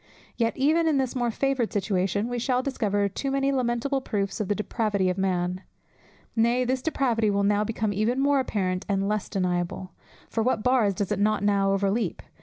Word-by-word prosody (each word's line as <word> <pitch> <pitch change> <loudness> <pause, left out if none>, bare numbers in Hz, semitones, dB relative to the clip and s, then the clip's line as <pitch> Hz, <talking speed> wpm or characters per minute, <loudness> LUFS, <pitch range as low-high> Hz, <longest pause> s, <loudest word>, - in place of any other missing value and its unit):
Yet 230 -1 0
even 315 +5 +3
in 305 -3 +3
this 265 -2 -1
more 240 -2 0
favoured 265 0 0
situation 200 +1 0
we 245 0 -3
shall 250 +1 0
discover 205 -7 0
too 235 +8 -4
many 275 0 +1
lamentable 260 +1 0
proofs 200 -5 -2
of 210 - -1
the 205 - 0
depravity 205 -3 0
of 180 - -5
man. 180 -1 -1 0.7
Nay, 235 +2 +3
this 255 +1 0
depravity 245 -7 +1
will 200 0 +1
now 205 +1 +2
become 215 -1 -2
even 220 +6 0
more 280 0 +3
apparent 185 -7 -1
and 195 0 +1
less 210 -1 -1
deniable. 180 -1 -2 0.4
For 225 - -2
what 225 -2 0
bars 245 -6 +3
does 200 +2 -2
it 205 - 0
not 210 0 +1
now 200 -1 +2
overleap? 195 0 0
215 Hz, 190 wpm, -26 LUFS, 200-255 Hz, 0.7 s, even